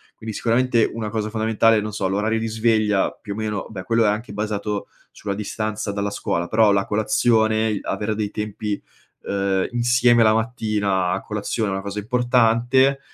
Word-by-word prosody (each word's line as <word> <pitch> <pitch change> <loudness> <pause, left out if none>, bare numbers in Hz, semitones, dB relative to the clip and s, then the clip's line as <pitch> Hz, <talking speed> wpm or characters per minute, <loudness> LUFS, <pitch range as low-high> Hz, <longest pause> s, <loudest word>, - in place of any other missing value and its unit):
Quindi, 110 0 -7
sicuramente, 120 +1 +2
una 110 -2 -4
cosa 110 0 -2
fondamentale, 110 0 +2
non 105 +1 -4
so, 100 -2 -1
l'orario 105 +4 0
di 115 - -2
sveglia, 110 -2 +1
più 100 - -8
o - - -8
meno 105 -2 -3
beh, 95 -4 -7
quello 115 +2 +2
è - - +4
anche 105 +3 -3
basato 105 0 -3 0.2
sulla 100 -1 -5
distanza 105 0 -3
dalla 100 0 -2
scuola, 85 -3 -2
però 110 0 +4
la 100 0 +2
colazione, 110 +1 +2
i 105 - -2
avere 105 +1 -2
dei 105 -1 -2
tempi, 105 -1 -4 0.4
uhm, 100 -1 0
insieme 120 -1 +4
la 110 - +5
mattina 105 -5 0
a - - -1
colazione 110 -3 -2
è 95 - -2
una 95 - -2
cosa 100 +1 -4
importante, 125 +3 +2
110 Hz, 180 wpm, -22 LUFS, 105-115 Hz, 0.4 s, la